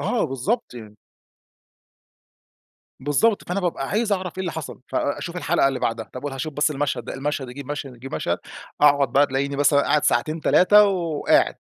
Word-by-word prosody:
آه 245 -3 0
بالضبط 135 - -2
يعني. 105 -3 -11 2.0
بالضبط 145 - +1
فأنا 190 +3 -1
بابقى 170 -6 -2
عايز 215 0 0
أعرف 185 -2 -2
إيه - - -1
اللي 180 -3 -3
حصل، 160 -3 -7
فأ 145 0 -1
أشوف 170 +5 -6
الحلقة 165 -5 +2
اللي 135 - -3
بعدها، 115 -1 -2
طب 130 +3 -8
وهاشوف 145 +2 -4
بس 150 +2 +1
المشهد 145 0 -2
ده، - - -6
المشهد 140 -1 -3
يجيب 140 +2 -9
مشهد 145 -3 -5
يجيب 135 +3 -8
مشهد، - - -1 0.4
أقعد 140 -3 +4
بقى 145 +2 +5
تلاقيني 140 +1 -2
مثلًا 145 0 +4
قاعد 150 +1 +1
ساعتين 155 +1 +1
3 205 +6 +6
وقاعد. 170 -6 +1
145 Hz, 175 wpm, -23 LUFS, 135-175 Hz, 2.0 s, 3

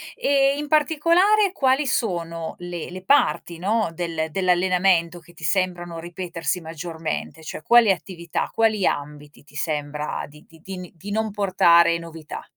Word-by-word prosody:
E 275 0 +2
in 295 0 -4
particolare 335 +7 +3
quali 270 -4 +2
sono 170 -9 -2
le 175 -2 -6
le 185 +1 -9
parti, 170 - +2
no, 210 +2 0
del 165 -2 -3
dell'allenamento 180 -1 +2
che 175 0 -19
ti - - -14
sembrano 175 -3 -1
ripetersi 175 -1 -4
maggiormente, 160 0 -5
cioè 155 - -7
quali 235 0 +6
attività, 175 -3 -3
quali 220 -4 +2
ambiti 145 0 -4
ti 145 - -20
sembra 150 -1 -3
di 150 +1 -17
di 165 0 -19
di 190 +1 -7
n 180 -1 -8
di 195 +5 -9
non 220 0 -1
portare 170 -4 +4
novità? 165 -2 -9
175 Hz, 150 wpm, -23 LUFS, 165-215 Hz, -, quali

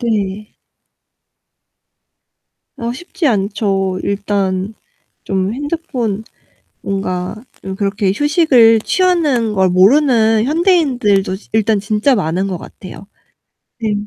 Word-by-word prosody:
네. 210 -3 -2 2.3
아 235 0 -3
쉽지 350 +6 -5
않죠. 195 -4 0
일단 200 -1 -2 0.5
좀 190 +1 -1
핸드폰 255 -7 -3 0.6
뭔가 185 -1 -3 0.3
좀 190 0 -6
그렇게 200 0 0
휴식을 280 -7 +4
취하는 300 - +1
걸 190 -1 +2
모르는 220 +3 +4
현대인들도 265 - +1
지 200 - -15
일단 220 -1 +2
진짜 215 +6 +1
많은 185 -1 -1
것 185 -2 -3
같아요. 185 +3 -11 0.7
네 220 -2 -1
215 Hz, 190 characters per minute, -16 LUFS, 195-255 Hz, 2.3 s, 휴식을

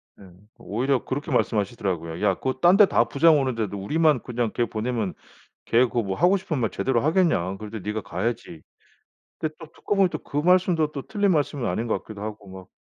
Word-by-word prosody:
네 95 -2 -16 0.3
오히려 130 +5 -1
그렇게 140 +2 -4
말씀하시더라고요. 95 -6 -1
"야 95 - +4
그거 130 +6 -2
딴 175 +6 +6
데 210 - +8
다 115 - +3
부장 150 +4 +4
오는데도 115 -7 -2
우리만 150 +10 +2
그냥 120 -3 -2
걔 120 - +1
보내면 110 -4 -3 0.5
걔 120 +2 +4
그 120 - -3
뭐 95 -2 -3
하고 180 +4 +4
싶은 170 -6 -3
말 115 -3 0
제대로 130 -3 0
하겠냐. 155 - +1
그럴 105 +1 -9
때 110 - -5
네가 105 +2 -4
가야지." 95 -3 -4 0.8
근데 155 -1 -3
또 160 - -9
듣고 205 - -3
보니 195 -2 +4
또 - - -4
그 145 - -4
말씀도 175 -1 +3
또 140 - -5
틀린 205 -2 +1
말씀은 145 -5 0
아닌 115 - -2
것 110 - -1
같기도 105 -2 -10
하고 105 -2 -7
막 95 -1 -11
120 Hz, 400 characters per minute, -24 LUFS, 105-155 Hz, 0.8 s, 데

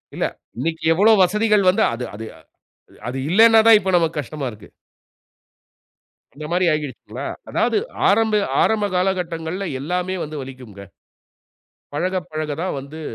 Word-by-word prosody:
இல்ல. - - -1 0.3
இன்னைக்கி 160 +5 -3
எவ்வளவு 210 +4 +4
வசதிகள் 210 +2 +2
வந்து, 185 - +2
அது 120 +2 -4
அது 110 +2 -7 0.8
அது 130 - -5
இல்லைன்னா 225 +5 +6
தான் 225 -2 +9
இப்ப 190 -1 -2
நமக்கு 165 -2 0
கஷ்டமா 145 +1 -6
இருக்கு. 105 -1 -14 1.7
அந்த 150 - -8
மாரி 180 +1 +2
ஆகிடுச்சுங்களா? 150 -3 -5 0.2
அதாவது - - +1 0.3
ஆரம்ப, 220 +1 +2 0.3
ஆரம்ப 215 -2 +1
காலகட்டங்கள்ல 180 0 -2
எல்லாமே 180 +5 -2
வந்து 150 -1 -6
வலிக்கும்ங்க. 125 -7 -11 1.1
பழகப் 180 +1 -2
பழக 155 -1 -3
தான் 185 - -2
வந்து 145 +4 -10
170 Hz, 130 wpm, -21 LUFS, 150-195 Hz, 1.7 s, தான்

